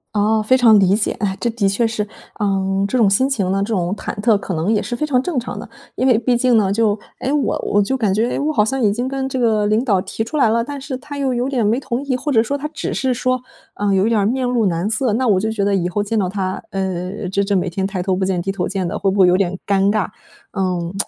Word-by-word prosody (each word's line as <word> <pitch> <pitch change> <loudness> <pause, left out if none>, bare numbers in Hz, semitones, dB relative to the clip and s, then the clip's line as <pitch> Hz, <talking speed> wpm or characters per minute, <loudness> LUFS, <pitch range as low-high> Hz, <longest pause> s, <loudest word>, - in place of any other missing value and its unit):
哦， 215 +1 +2
非 215 +5 +3
常 230 -5 +6
理 190 0 +4
解。 215 - 0
唉， 195 -2 -1
这 240 - +1
的 225 -3 0
确 200 +5 +1
是 220 -2 -2 0.3
呃 195 -1 0
这 255 - -1
种 220 -5 +4
心 260 +8 +3
情 200 -9 0
呢， 195 +1 0
这 215 +3 -1
种 180 -2 0
忐 - - -5
忑， 220 -1 +4
可 195 - -5
能 170 +6 0
也 210 - +1
是 240 - -4
非 305 - -1
常 260 -4 +2
正 325 +1 -3
常 245 - -3
的。 - - -9 0.3
因 255 - +1
为 245 -4 +5
毕 240 +1 +1
竟 245 0 +3
呢 205 -3 +3
就 210 0 +2 0.2
诶， 270 - -1
我 295 -2 0
我 205 - +3
就 265 +7 0
感 215 -6 +1
觉 225 +5 0
我 300 +2 0
好 210 - +3
像 265 +5 -1
已 205 -3 +3
经 245 +4 -2
跟 270 0 -2
这 265 - -3
个 220 -4 +2
领 215 +3 +2
导 205 -8 +2
提 225 - -4
出 270 +7 -4
来 270 - +4
了， 230 +1 +2
但 285 +3 -6
是 270 0 -5
他 285 +2 -9
又 270 -2 0
有 245 +2 -1
点 250 -5 0
没 235 +5 +1
同 255 -1 -3
意， 270 -2 0
或 275 +4 -3
者 225 -5 +4
说 280 +5 -2
他 285 - -7
只 305 -2 -4
是 260 -1 0
说 255 +1 -1 0.3
呃 205 -1 0
有 190 +1 +3
一 - - +2
点 225 -3 +2
儿 - - +1
面 250 +4 0
露 240 -4 +1
难 175 +3 -1
色， 225 +2 0
那 250 +4 0
我 205 -4 +4
就 220 +4 -1
觉 205 -3 -1
得 200 0 +2
以 175 -2 0
后 205 +3 -1
见 210 +2 -2
到 190 -4 +1
他， 190 -1 -3
呃 185 -1 -3
这 200 +2 0
这 200 +1 -1
每 180 0 -1
天 190 +2 -2
抬 195 -2 -3
头 185 +1 0
不 190 - -1
见 185 -2 0
低 195 +2 -2
头 180 -3 -2
见 190 -3 -2
的， 205 +4 -3
会 195 - +1
不 200 - -2
会 185 - +7
有 180 - +4
点 185 -1 0
尴 200 0 +3
尬。 210 -4 0 0.5
嗯， 180 -2 -2
215 Hz, 315 characters per minute, -19 LUFS, 195-250 Hz, 0.5 s, 会